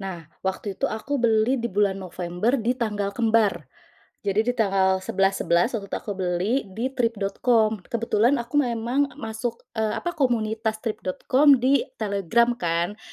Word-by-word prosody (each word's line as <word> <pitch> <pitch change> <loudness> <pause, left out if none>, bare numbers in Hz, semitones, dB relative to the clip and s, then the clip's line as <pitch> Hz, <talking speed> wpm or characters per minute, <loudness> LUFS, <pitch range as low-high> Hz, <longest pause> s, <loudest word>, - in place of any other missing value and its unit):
Nah, 185 -4 -6 0.2
waktu 190 +2 -3
itu - - -1
aku 265 +5 -3
beli 230 +2 +2
di 235 - -2
bulan 195 -1 +1
November, 180 +6 -1
di 235 0 0
tanggal 210 -5 -2
kembar. 220 - +1 0.6
Jadi, 200 +2 +2
di - - -2
tanggal 190 -3 +2
11.11 195 0 +1
waktu 200 - -9
itu, - - -3
aku 210 - -6
beli 180 +4 0 0.2
di 245 +5 -2
Trip.com. 225 -2 +1
Kebetulan 230 +2 +1
aku 245 +5 -1
memang 245 +1 +1
masuk, 225 -2 -5 0.2
eee, 220 -1 +1
apa, 350 - -2
komunitas 220 -4 0
Trip.com 255 +6 +3
di 265 +1 +3
Telegram, 210 +3 +1
kan. 170 +4 -1
220 Hz, 145 wpm, -24 LUFS, 195-235 Hz, 0.6 s, Trip.com